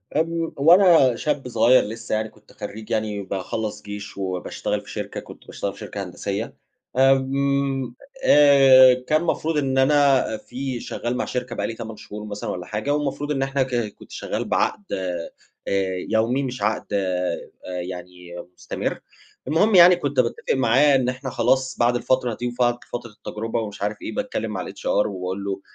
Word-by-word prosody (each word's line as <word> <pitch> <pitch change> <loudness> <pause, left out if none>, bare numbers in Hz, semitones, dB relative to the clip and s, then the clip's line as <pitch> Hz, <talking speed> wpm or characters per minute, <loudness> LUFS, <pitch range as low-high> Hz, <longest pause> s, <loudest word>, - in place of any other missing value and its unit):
آمم، 165 +1 0
وأنا 165 -4 +6
شاب 145 -1 -2
صغيّر 120 +2 +4
لسّه 115 +1 -4
يعني 110 0 -2
كنت 105 -1 -22
خرّيج 105 +1 -8
يعني 110 -2 -1
باخلّص 100 +3 -4
جيش 105 -1 -8
وباشتغل 95 -2 -3
في - - -15
شركة، - - -5
كنت - - -13
باشتغل - - -4
في - - -15
شركة - - -5
هندسية، - - -4 0.4
آمم، 135 -1 +2 0.3
آآ، 135 -3 +8
كان 155 +2 +2
مفروض 160 -2 0
إن 135 -2 0
أنا 140 0 +4
في 130 +2 -5
شغّال 120 +1 -4
مع - - -1
شركة 125 -1 -4
بقى - - -1
لي - - -4
8 115 -1 -8
شهور 105 +1 -8
مثلًا 105 -1 -5
والّا 90 -1 -4
حاجة، 105 +8 -2
والمفروض 145 0 -2
إن 135 -2 0
إحنا 135 0 0
ك 130 -1 -4 0.2
كنت - - -16
شغّال - - -4
بعَقد 210 - 0
آآ، 90 -3 -3 0.8
يومي 115 +5 +1
مش 125 -5 -5
عَقد 105 +1 0
آآ، 90 -3 0 0.4
يعني 90 -1 -9 0.2
مستمر. - - -4 0.5
المهم 195 +8 +3
يعني 180 0 +9
كنت 145 -6 -2
باتفق 115 -2 0
معاه 135 +3 +4
إن 125 -1 +2
إحنا 130 +1 -5
خلاص 130 +2 +1
بَعد 120 +1 +3
الفترة 125 -1 +1
دي 120 - -2
وفقع 120 0 0
فترة 120 -2 -5
التجربة 110 +2 -4
ومش 105 -2 -7
عارف 105 +1 -1
إيه - - -6
باتكلّم 255 - -3
مع 95 -3 -4
الHR - - -10 0.2
وباقول 95 0 -4
له: 100 0 -3
125 Hz, 170 wpm, -23 LUFS, 105-140 Hz, 0.8 s, يعني